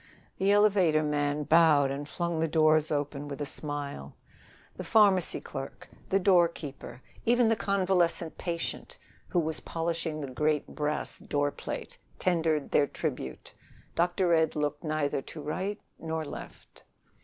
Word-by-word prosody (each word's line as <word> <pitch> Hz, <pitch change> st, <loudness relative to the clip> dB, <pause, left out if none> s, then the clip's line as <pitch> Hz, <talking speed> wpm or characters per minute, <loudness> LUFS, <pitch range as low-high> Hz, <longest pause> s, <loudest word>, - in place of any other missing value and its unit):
The 195 Hz, +1 st, +3 dB
elevator 195 Hz, -7 st, +4 dB
man 145 Hz, 0 st, 0 dB
bowed 150 Hz, -3 st, +5 dB
and 145 Hz, +2 st, -5 dB
flung 170 Hz, -1 st, -2 dB
the 165 Hz, -, +2 dB
doors 155 Hz, -1 st, +3 dB
open, 145 Hz, -1 st, -2 dB
with 140 Hz, -2 st, -6 dB
a 145 Hz, -, -2 dB
smile; 140 Hz, -, -5 dB, 0.6 s
the -, -, -6 dB
pharmacy 200 Hz, -5 st, +4 dB
clerk, 135 Hz, -, -8 dB, 0.2 s
the 195 Hz, -, +3 dB
doorkeeper, 170 Hz, -9 st, +1 dB, 0.2 s
even 240 Hz, 0 st, +4 dB
the 225 Hz, -, +3 dB
convalescent 185 Hz, -5 st, +1 dB
patient 170 Hz, -1 st, -4 dB, 0.3 s
who -, -, -3 dB
was 160 Hz, -1 st, -1 dB
polishing 165 Hz, -1 st, -3 dB
the 140 Hz, -3 st, -5 dB
great 150 Hz, +3 st, +1 dB
brass 150 Hz, 0 st, -3 dB
doorplate, 145 Hz, 0 st, -3 dB, 0.2 s
tendered 160 Hz, -4 st, +1 dB
their 145 Hz, -, +4 dB
tribute. 125 Hz, -, -5 dB, 0.4 s
Dr. 175 Hz, +1 st, +2 dB
Ed 160 Hz, -1 st, +2 dB
looked 150 Hz, -1 st, -2 dB
neither 155 Hz, -3 st, -1 dB
to 155 Hz, -, -10 dB
right 185 Hz, +8 st, -3 dB, 0.2 s
nor 160 Hz, -1 st, -3 dB
left. -, -, -10 dB
155 Hz, 135 wpm, -29 LUFS, 145-175 Hz, 0.6 s, bowed